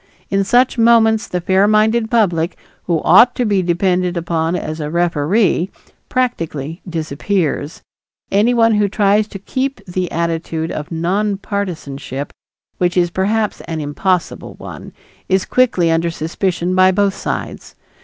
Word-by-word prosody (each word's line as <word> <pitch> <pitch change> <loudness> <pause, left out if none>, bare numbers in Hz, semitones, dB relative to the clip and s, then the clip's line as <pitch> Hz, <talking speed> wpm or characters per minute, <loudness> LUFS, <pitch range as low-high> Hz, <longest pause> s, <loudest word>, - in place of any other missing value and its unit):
In 195 0 +2
such 245 +4 +2
moments 225 -1 +4
the 180 - -2
fair 190 +3 +3
minded 220 +2 +2
public, 180 -7 +1 0.3
who 170 -3 0
ought 240 +8 +6
to 245 - 0
be 200 -3 +2
depended 180 0 0
upon 165 0 -1
as 155 -2 -4
a 150 -1 -3
referee, 175 +3 +1 0.4
practically 165 - -2
disappears. 160 0 -2 0.5
Anyone 230 +2 +3
who 210 -1 +2
tries 205 +1 +2
to 200 - -8
keep 265 +7 -3
the 180 -1 -3
attitude 165 -1 -2
of 150 -1 -5
nonpartisanship, 175 -6 -3 0.5
which 180 0 +1
is 175 -1 +2
perhaps 210 +4 -1
an 160 -1 -3
impossible 170 +5 -2
one, - - -10 0.4
is 190 0 +2
quickly 190 -10 +2
under 165 +1 +1
suspicion 175 +2 -2
by 185 0 +5
both 200 +1 +1
sides. - - -5
185 Hz, 135 wpm, -17 LUFS, 165-210 Hz, 0.5 s, ought